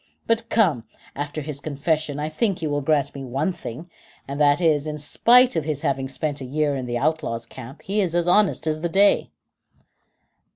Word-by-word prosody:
But 230 0 0
come, 170 - +2 0.3
after 145 +2 -4
his 145 -1 -5
confession, 150 0 -2
I 150 - -2
think 175 +3 -1
you 155 - -1
will 145 0 0
grant 145 -1 +1
one 135 +6 -2
thing, 160 -1 -8 0.4
and 140 +2 -4
that 145 +1 +4
is, 155 -4 +2
that - - -3
in 150 - -4
spite 240 - +4
of 160 - 0
his 150 -1 -3
having 135 -3 0
spent 140 +2 -3
a - - -5
year 145 +2 0
in 130 -2 -4
the 120 0 -2
outlaws' 145 -5 -1
camp, 130 +4 -11
he 205 +2 0
is 175 -3 -1
as 175 0 +1
honest 190 -3 +3
as 155 0 -1
the 170 - -1
day." 200 +3 +3
150 Hz, 200 wpm, -23 LUFS, 140-170 Hz, 0.4 s, that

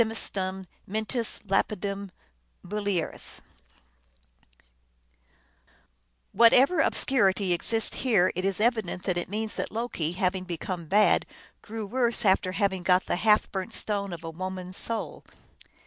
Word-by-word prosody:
251 190 -4 -2
semiustum - - -33 0.2
mentis 220 +3 -3
lapidem 200 0 -1 0.6
mulieris" 200 -3 -3 2.9
Whatever 255 - +5
ob - - +2
scurity 200 -7 +2
exists 225 +6 +2
here, 205 -8 +3
it 185 - -3
is 195 0 0
evident 220 -6 0
that 185 - -1
it 175 - -6
means 215 +2 -3
that - - -2
Loki, 215 -8 -3
having 185 0 -1
become 175 -1 -5
bad, 210 +5 +4 0.3
grew 220 0 -6
worse 235 +1 +1
after 190 -1 +3
having 195 -2 0
got 180 +1 +3
the - - -1
half 210 +2 +3
burnt 190 +3 -3
stone 200 -3 -2
of 170 -1 -7
a 165 - -5
woman 185 +2 -5
s 185 - -1
soul. 215 -9 -3
200 Hz, 130 wpm, -27 LUFS, 185-220 Hz, 2.9 s, Whatever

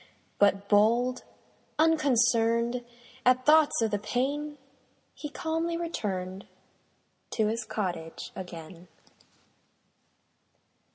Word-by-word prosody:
But 200 0 +3
bold, 235 +5 +3 0.5
unconcern'd 245 -6 +3 0.4
At 255 0 +3
thoughts 305 -5 +5
of 220 - 0
the 205 - 0
pain, 285 +7 -2 0.6
He 295 - -7
calmly 325 +2 -2
return'd 195 - -4 0.9
To 220 - +1
his 220 +2 -1
cottage 175 -7 -4
again. 175 -1 -9
235 Hz, 80 wpm, -28 LUFS, 200-290 Hz, 0.9 s, thoughts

